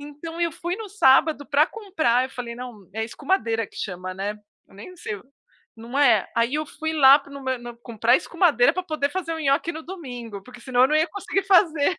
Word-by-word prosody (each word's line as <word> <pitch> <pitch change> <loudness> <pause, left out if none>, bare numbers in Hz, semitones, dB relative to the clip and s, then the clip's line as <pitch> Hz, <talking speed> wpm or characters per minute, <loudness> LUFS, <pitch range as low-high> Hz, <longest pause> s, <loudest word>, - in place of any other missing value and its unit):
Então 295 +4 -8
eu 340 -1 +1
fui 345 +2 -4
no 440 -1 -7
sábado 295 -5 +3
para 295 +1 +3
comprar, 320 - 0
eu 260 - -7
falei: 240 -2 -6
"Não" 235 -6 -10
é 220 +2 -2
escumadeira 230 - -1
que - - -20
chama, 185 -1 -5
né. 195 +2 -3 0.4
Eu - - -21
nem 360 - -11
sei 215 -11 -5
o 200 - -15 0.5
não 235 +5 -6
é. 235 -8 +4
Aí 230 +2 +2
eu 305 0 -2
fui 315 +2 -4
lá 280 -2 +7
no 280 0 -9
m 260 - 0
no 240 0 -9
comprar 235 0 +1
escumadeira 320 - +2
pra 370 - -2
poder 310 -5 -1
fazer 365 -3 -3
o - - -5
nhoque 290 +3 +1
no 320 - -8
domingo, 245 - -8
porque 245 +2 -14
senão 250 -1 +1
eu 260 - +5
não 305 - +2
ia 315 +2 +2
conseguir 390 0 -2
fazer. 340 -4 +3
280 Hz, 220 wpm, -23 LUFS, 235-330 Hz, 0.5 s, lá